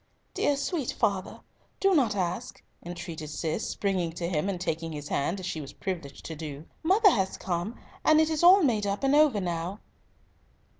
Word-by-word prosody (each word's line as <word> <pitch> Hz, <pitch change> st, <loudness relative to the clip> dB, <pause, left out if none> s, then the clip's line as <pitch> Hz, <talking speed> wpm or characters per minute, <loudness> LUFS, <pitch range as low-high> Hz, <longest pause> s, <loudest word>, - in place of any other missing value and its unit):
"Dear 290 Hz, -, +2 dB
sir, 280 Hz, -, -2 dB
sweet 315 Hz, -9 st, -2 dB
father, 195 Hz, -1 st, -1 dB, 0.4 s
do 390 Hz, 0 st, +4 dB
not 255 Hz, -, +3 dB
ask," 185 Hz, +5 st, -3 dB, 0.2 s
entreated 170 Hz, -3 st, -6 dB
Cis, 155 Hz, +6 st, -2 dB
springing 185 Hz, -4 st, -1 dB
to 170 Hz, 0 st, -3 dB
him, 170 Hz, +2 st, 0 dB
and 185 Hz, -3 st, -2 dB
taking 165 Hz, -2 st, -2 dB
his 145 Hz, -1 st, -6 dB
hand, 165 Hz, +8 st, 0 dB
as 185 Hz, -, -6 dB
she 165 Hz, -3 st, -3 dB
was 140 Hz, -, -9 dB
privileged 170 Hz, -8 st, -5 dB
to 160 Hz, -, -5 dB
do; 150 Hz, -1 st, -7 dB, 0.2 s
"mother 390 Hz, +5 st, +5 dB
has 190 Hz, -, 0 dB
come, 180 Hz, +5 st, -3 dB, 0.2 s
and 310 Hz, 0 st, +5 dB
it 315 Hz, 0 st, +3 dB
is 310 Hz, -, 0 dB
all 365 Hz, +2 st, +8 dB
made 215 Hz, -7 st, +2 dB
up 200 Hz, +5 st, -2 dB
and 270 Hz, +1 st, +3 dB
over 295 Hz, -7 st, +5 dB
now." 175 Hz, +2 st, -3 dB
190 Hz, 190 wpm, -28 LUFS, 165-270 Hz, 0.4 s, all